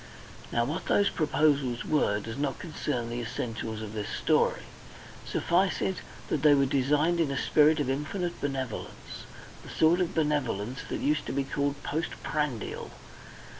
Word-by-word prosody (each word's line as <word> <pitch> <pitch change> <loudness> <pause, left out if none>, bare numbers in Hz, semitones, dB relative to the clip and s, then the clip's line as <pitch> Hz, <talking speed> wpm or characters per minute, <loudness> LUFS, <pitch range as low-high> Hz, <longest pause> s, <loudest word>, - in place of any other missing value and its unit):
Now 120 0 +2
what 150 +7 -3
those 200 - +3
proposals 145 -5 +1
were 105 -9 +2
does 110 +2 -6
not 140 -2 -1
concern 140 -8 -3
the 120 +1 -2
essentials 115 -2 -4
of 105 -1 -7
this 105 -2 -4
story. - - +2 0.6
Suffice 185 +3 +1
it 190 - -1 0.3
that 145 - 0
they 150 -1 +7
were 140 -1 +4
designed 145 +6 +2
in 160 -4 +2
a 140 - -2
spirit 155 +2 +4
of 145 - 0
infinite 165 +6 -2
benevolence, 135 -4 -5 0.3
the - - -12
sort 165 +3 +3
of 175 - -1
benevolence 130 -7 0
that - - -3
used 150 +1 +1
to - - -3
be 140 0 +1
called 140 +1 -2
post 160 +3 -3
prandial. 145 -7 -2
145 Hz, 160 wpm, -29 LUFS, 125-155 Hz, 0.6 s, they